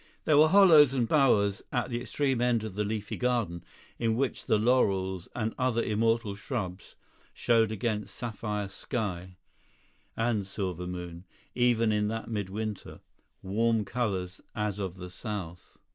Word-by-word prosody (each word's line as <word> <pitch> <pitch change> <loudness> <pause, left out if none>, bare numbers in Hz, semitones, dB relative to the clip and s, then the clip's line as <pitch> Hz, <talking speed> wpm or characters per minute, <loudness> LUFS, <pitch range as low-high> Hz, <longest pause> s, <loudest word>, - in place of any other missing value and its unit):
There 155 - +4
were 155 - +7
hollows 155 -7 +7
and 120 -3 +1
bowers 105 -9 +3
at 125 0 -1
the 120 0 -2
extreme 130 +2 -1
end 120 -3 +2
of 110 -3 -5
that 105 +2 -1
leafy 105 -1 -3
garden, 115 -9 -1 0.4
in 115 -1 +1
which 135 +2 -2
the 110 - +4
laurels 95 -6 +1
and 110 -2 -1
other 125 -2 +1
immortal 115 0 +1
shrubs 100 -3 -5 0.4
showed 115 -2 +2
against 105 -2 -3
sapphire 105 -3 -3
sky 95 -4 -4 0.8
and 115 -4 0
silver 90 -3 -4
moon, 90 0 -7 0.3
even 120 -2 +3
in 105 0 +1
that 115 +1 -4
midwinter, 105 0 -4 0.4
warm 110 +3 +1
colours 95 -6 -2
as 105 -1 -2
of 95 -3 -3
the 90 -1 -9
south. 90 -5 -7
110 Hz, 145 wpm, -29 LUFS, 95-120 Hz, 0.8 s, were